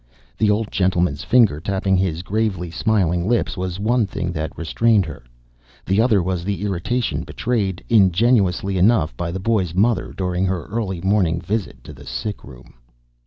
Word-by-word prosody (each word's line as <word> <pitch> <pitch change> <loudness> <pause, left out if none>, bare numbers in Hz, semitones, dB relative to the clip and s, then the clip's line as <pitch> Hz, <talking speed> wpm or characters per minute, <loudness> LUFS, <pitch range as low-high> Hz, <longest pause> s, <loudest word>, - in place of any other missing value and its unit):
The 110 - +1
old 105 +1 0
gentleman's 90 -5 0
finger 115 -12 +4
tapping 95 +2 0
his 90 -3 -1
gravely 95 -4 -2
smiling 90 -1 0
lips 120 -1 0
was 90 0 -4
one 115 +1 +1
thing 90 -1 -3
that 80 -1 -5
restrained 105 +4 +2
her; 80 - -8 0.6
the 95 +3 +2
other 110 -6 +3
was 90 -1 -2
the 100 0 -3
irritation 105 +5 -1
betrayed, 100 -7 -2
ingenuously 100 -2 +3
enough, 90 - +3
by 85 +6 -3
the 90 +3 -4
boy's 95 -5 0
mother 110 +2 +1
during 90 0 -1
her 95 -2 -2
early 100 -5 -3
morning 95 -4 +1
visit 100 +4 -4
to 75 - -10
the 70 0 -14
sickroom. 65 - -7
95 Hz, 160 wpm, -21 LUFS, 85-110 Hz, 0.6 s, finger